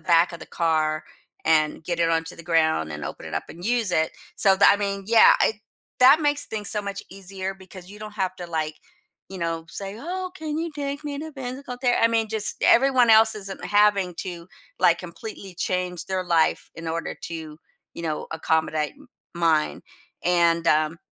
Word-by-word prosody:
back 170 +2 +3
of 170 - -8
the - - -9
car 155 -2 0 0.4
and 155 0 +2
get 170 0 -2
it 165 - +3
onto 165 +1 -1
the 170 - -10
ground 160 - +1
and 75 -1 -6
open - - -7
it - - -6
up - - -2
and 175 +2 -10
use 230 -4 +1
it, 160 -1 +2 0.3
so 195 -2 +4
tha 190 - +6
I 200 - +6
mean, 200 -1 -3
yeah, 230 +1 +7
it 220 - +1 0.4
that 270 +5 +8
makes 290 -1 0
things 210 -2 -4
so 210 0 -1
much 200 0 -5
easier 195 0 -6
because 185 -1 -13
you 205 - -11
don't 215 0 -7
have 185 -2 -1
to, 175 - -7
like, 155 -2 -2 0.6
you 190 - -7
know, 165 -1 -2
say, 195 +5 -6
"Oh, 365 +6 -4
can 310 -2 -4
you 335 0 -2
take 285 0 -4
me 285 -1 -4
to 315 +1 -7
physical 260 -1 -6
ther" 245 -2 +3
I 230 - +6
mean, 225 -1 +1
just 215 -1 -1
everyone 255 -2 +5
else 220 0 +6
isn't 195 -2 -6
having 205 -3 +3
to, 175 -1 -6 0.3
like, 170 0 +5
completely 190 +1 -9
change 180 -1 -2
their 190 -1 -2
life 170 -2 +1
in 165 0 -6
order 165 +1 -3
to, 160 -2 -7 0.4
you - - -7
know, 155 -2 -3
accommodate 160 -1 0
m 290 -2 -18 0.3
mine. 165 -3 +1 0.4
And, 170 -1 +3
um, 155 +1 +2
185 Hz, 195 wpm, -24 LUFS, 165-220 Hz, 0.6 s, that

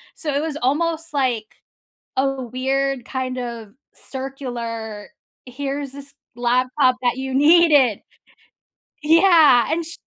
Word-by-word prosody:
So, 300 -3 -4
it 285 - 0
was 310 -1 -4
almost, 325 +4 -1
like, 250 -6 0 0.7
a 270 0 0
weird, 265 +1 -2
kind 255 0 -4
of 235 -4 -7 0.2
circular 235 -6 -7 0.4
here's 275 +2 -5
this 280 0 -12 0.2
laptop 255 +2 +1
that 245 0 +1
you 265 0 -4
needed. 295 - +5 1.0
Yeah, 315 -5 +5
and 335 +1 -1
sh 330 - -8
265 Hz, 115 wpm, -21 LUFS, 245-290 Hz, 1.0 s, needed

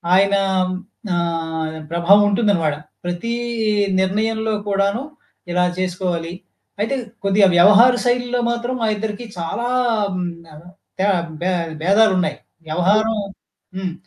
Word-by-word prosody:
ఆయన 200 +1 +4 0.8
ఆహ్, 160 -2 -2 0.2
ప్రభావముంటుందనమాట. 195 -2 +3 0.3
ప్రతీ 175 +7 -3 0.7
నిర్ణయంలో 220 +3 0 0.2
కూడాను 200 +4 +1 0.5
ఇలా 180 0 +2 0.2
చేసుకోవాలి. 175 -2 -2 0.5
అయితే 270 +6 0 0.3
కొద్దిగా 195 0 +4
వ్యవహార 210 +7 +7
శైలిలో 245 0 +1
మాత్రం 240 +2 -2
మా - - +2
ఇద్దరికి 220 +2 -5
చాలాం 225 +2 -1 0.8
తే - - +1 0.4
భే 185 - 0 0.3
భేదాలున్నాయి. 190 0 +3 0.3
వ్యవహారం 205 +7 +2 0.6
హ్మ్. 185 -2 -3
200 Hz, 90 wpm, -20 LUFS, 175-225 Hz, 0.8 s, వ్యవహార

